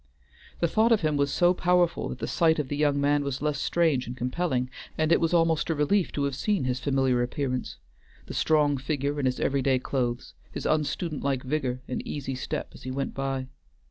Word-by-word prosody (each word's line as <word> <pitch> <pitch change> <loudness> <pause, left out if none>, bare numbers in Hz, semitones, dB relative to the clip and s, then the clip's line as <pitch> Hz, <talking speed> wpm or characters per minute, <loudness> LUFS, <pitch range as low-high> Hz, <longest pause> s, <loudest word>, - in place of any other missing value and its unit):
The 170 - +4
thought 220 +7 +3
of 225 - +4
him 155 -2 +1
was 140 -1 +1
so 175 +4 +4
powerful 180 -1 +2
that - - -5
the - - -3
sight 160 -1 +2
of 145 -4 -2
the 145 - -2
young 145 -1 +2
man 145 +1 +2
was 140 -2 -3
less 150 -1 0
strange 160 -7 +1
and 125 +1 -6
compelling, 125 -1 -1 0.3
and 155 0 +1
it - - +4
was 165 - +2
almost 165 -2 +2
a 165 - +1
relief 155 +6 +2
to 145 - -1
have 140 -1 0
seen 160 +5 0
his 125 0 -1
familiar 135 -3 +1
appearance, 125 +1 -2 0.5
the - - -8
strong 150 -2 +2
figure 140 +1 -2
in 135 - +1
its 130 - -1
every 140 0 +1
day 130 0 +3
clothes, 125 -2 -2 0.2
his - - -6
unstudent 155 +1 0
like 135 -2 -1
vigor, 130 -2 -2
and 125 - -3
easy 135 -2 -4
step 130 - -4
as - - -13
he 130 - -6
went 135 +1 -3
by. 135 -1 -2
140 Hz, 215 wpm, -27 LUFS, 130-160 Hz, 0.5 s, The